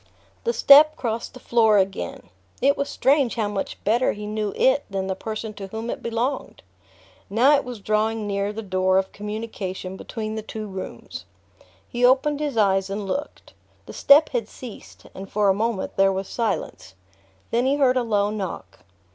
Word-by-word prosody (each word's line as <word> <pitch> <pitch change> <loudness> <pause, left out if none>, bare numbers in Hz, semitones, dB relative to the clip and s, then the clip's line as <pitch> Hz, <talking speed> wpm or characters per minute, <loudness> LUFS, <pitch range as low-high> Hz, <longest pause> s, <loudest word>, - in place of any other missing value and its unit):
The 470 - +2
step 305 -2 +7
crossed 230 -4 -4
the - - -10
floor 225 -3 +3
again. 195 0 -2 0.3
It 280 +2 +3
was 280 - -2
strange 275 -2 +2
how 220 -3 0
much 205 -1 -4
better 235 +5 +2
he 210 0 -7
knew 210 -1 -2
it 265 +2 +3
than 195 -1 -2
the 190 - -1
person 215 +2 -6
to 195 -1 -8
whom 225 +4 -5
it - - -6
belonged! 235 +4 -3 0.7
Now 250 +8 +5
it 285 - 0
was 245 -3 -7
drawing 215 +1 0
near 200 0 -1
the 220 +1 -6
door 185 -1 +1
of 190 0 0
communication 205 -3 -6
between 215 0 -5
the 220 - -4
two 215 0 -7
rooms. 190 -2 -8 0.6
He 240 +1 -3
opened 270 +4 +4
his 290 -5 -3
eyes 195 -2 +2
and 200 +1 -4
looked. 285 +9 -5 0.3
The - - -10
step 295 +2 +6
had 235 -5 -2
ceased 245 -4 -11
and 195 +1 -9
for 210 -1 +2
a - - +5
moment 215 0 -2
there 195 0 +4
was 190 0 -3
silence. 220 - -3 0.6
Then 240 +3 +1
he 275 - +3
heard 265 -3 +3
a 255 - +2
low 210 -3 +1
knock. 190 - -6
220 Hz, 180 wpm, -23 LUFS, 200-250 Hz, 0.7 s, step